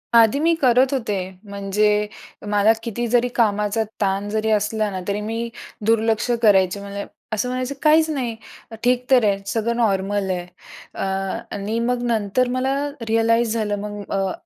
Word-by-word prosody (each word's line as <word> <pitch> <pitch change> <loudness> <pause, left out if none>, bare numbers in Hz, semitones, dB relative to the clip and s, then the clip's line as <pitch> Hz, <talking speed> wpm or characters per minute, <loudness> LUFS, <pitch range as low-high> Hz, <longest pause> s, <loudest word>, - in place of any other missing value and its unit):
आधी 230 +4 +6
मी 330 +2 +3
करत 260 -2 +3
होते, 220 -7 -1 0.3
म्हणजे 210 +1 0 0.4
मला 205 +1 +4
किती 235 +1 -3
जरी 240 +1 +3
कामाचा 210 -1 +1 0.2
ताण 200 +1 0
जरी 220 +1 -1
असला 215 0 +1
ना 185 - -4
तरी 205 +1 -1
मी 225 +2 -3 0.4
दुर्लक्ष 225 +1 +2
करायचे. 195 -3 +4
मला 200 0 -6 0.3
असं 215 +4 -1
म्हणायचं 255 +2 -3
काहीच 315 +1 +5
नाही 250 -7 -2 0.5
ठीक 250 0 +2
तर 255 -3 +6
आहे, 200 -1 +2
सगळं 230 +2 -1
नॉर्मल 200 -3 0
आहे 175 -1 -3 0.5
अ, - - -6 0.5
आणि 210 +3 -2
मग 245 +1 0
नंतर 220 +3 +1
मला 260 +2 0 0.3
रियलाइज 225 0 +2
झालं 210 -3 -1
मग 205 0 -6
अ, 195 -1 0
220 Hz, 155 wpm, -22 LUFS, 205-240 Hz, 0.5 s, आधी